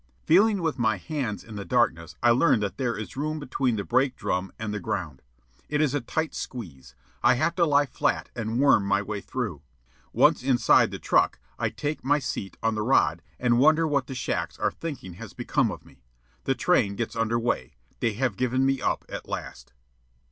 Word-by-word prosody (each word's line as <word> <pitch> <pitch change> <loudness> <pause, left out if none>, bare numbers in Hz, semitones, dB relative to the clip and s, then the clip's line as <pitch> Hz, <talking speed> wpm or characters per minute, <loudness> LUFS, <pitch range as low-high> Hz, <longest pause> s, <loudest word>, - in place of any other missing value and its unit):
Feeling 200 +2 +4
with 160 -5 -1
my 110 -3 +2
hands 125 - -4
in 110 -2 -9
the 100 - -4
darkness, 85 -10 0
I 120 - +6
learn 125 0 +4
that 100 -2 -3
there 125 -5 -1
is 105 - -7
room 155 +3 -2
between 130 -3 -1
the 100 - -2
brake 130 +3 +1
beam 90 +1 -2
and 110 -1 -4
the 105 - -2
ground. 80 -6 -4 0.5
It 150 - 0
is 150 -3 +2
a 145 - 0
tight 160 +6 -2
squeeze. 85 - -7 0.3
I 125 - +5
have 170 +7 +1
to 170 -2 +4
lie 145 -1 +4
flat 125 - -1
and 115 -1 -2
worm 140 -7 +5
my 100 +1 +1
way 105 0 -4
through. 105 - -4 0.5
Once - - +4
inside 130 -1 +4
the - - -6
truck, - - +2 0.2
I - - +1
take 150 +1 -4
my 145 +3 +3
seat 120 -8 -5
on 115 0 +2
the 110 - -2
rod 85 - +2 0.2
and 120 -1 +3
wonder 155 +4 +5
what 140 -4 0
the 130 - -6
shacks 125 - -2
are - - 0
thinking 140 - -7
has 110 -5 -8
become - - 0
of - - -8
me. 65 - -20 0.4
The - - +1
train 100 0 +2
gets 115 +1 -3
under 115 0 +1
way. 115 - -2 0.2
They 115 - 0
have 120 -2 -1
given 130 +1 +1
me 135 0 +1
up - - -1
at - - -7
last. - - -6
120 Hz, 205 wpm, -26 LUFS, 105-140 Hz, 0.5 s, I